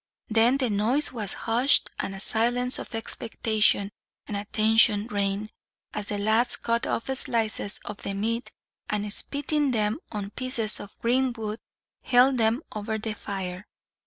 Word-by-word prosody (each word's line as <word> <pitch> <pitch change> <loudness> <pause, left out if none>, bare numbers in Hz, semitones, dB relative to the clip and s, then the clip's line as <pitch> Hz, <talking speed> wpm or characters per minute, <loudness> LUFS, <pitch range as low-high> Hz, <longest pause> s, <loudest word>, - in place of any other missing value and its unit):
Then 230 +4 +4
the 255 -5 0
noise 230 +9 +2
was 210 -5 -3
hushed, 240 +5 +4
and 195 - -3
a - - -7
silence 245 +4 +2
of - - -7
expectation 220 -2 +1 0.3
and 210 - -5
attention 215 +1 +3
reigned, 205 -1 -2 0.4
as 210 -1 -2
the 205 - -2
lads 220 +4 +2
cut 235 0 -1
off - - -1
slices 220 -5 0
of 205 - -6
the 200 - -4
meat 225 +2 -2 0.4
and, 210 -1 -1
spitting 290 +2 0
them 215 +1 0
on 205 -2 -4
pieces 235 -4 -2
of 205 - -11
green 255 +2 +2
wood, 220 -1 -5 0.4
held 255 +1 +4
them 225 +6 +2
over 215 +1 -3
the 220 0 -4
fire. 190 -2 -6
220 Hz, 150 wpm, -26 LUFS, 205-240 Hz, 0.4 s, Then